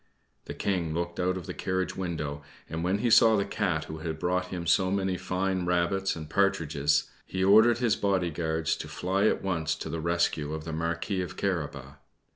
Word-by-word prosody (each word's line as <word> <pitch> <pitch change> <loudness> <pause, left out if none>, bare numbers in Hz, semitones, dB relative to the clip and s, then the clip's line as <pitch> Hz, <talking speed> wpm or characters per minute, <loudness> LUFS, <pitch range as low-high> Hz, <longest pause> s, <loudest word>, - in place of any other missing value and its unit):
The - - -7
King 85 -5 -1
looked 85 0 -3
out 90 +1 +1
of 90 - -7
the - - -5
carriage 95 0 -2
window, 75 -6 -3 0.3
and 80 +1 -4
when 95 +3 +1
he 120 +2 0
saw 110 0 +7
the 100 - +1
Cat 90 -7 -1
who 80 +1 -7
had 80 0 -4
brought 90 +2 0
him 90 -2 -5
so 95 +3 +3
many 95 -1 0
fine 95 +1 -1
rabbits 90 +2 +1
and 80 -2 -7
partridges, 75 -6 +1
he 95 0 -3
ordered 110 +4 +6
his 120 -3 +2
bodyguards 85 -5 0
to - - -6
fly 95 +3 0
at - - 0
once 80 -4 0
to - - -6
the 80 0 -3
rescue 85 -3 0
of 80 - -6
the 80 0 -5
Marquis 85 +4 -2
of 90 - -6
Carabas. 75 -7 -3
90 Hz, 195 wpm, -28 LUFS, 80-95 Hz, 0.3 s, saw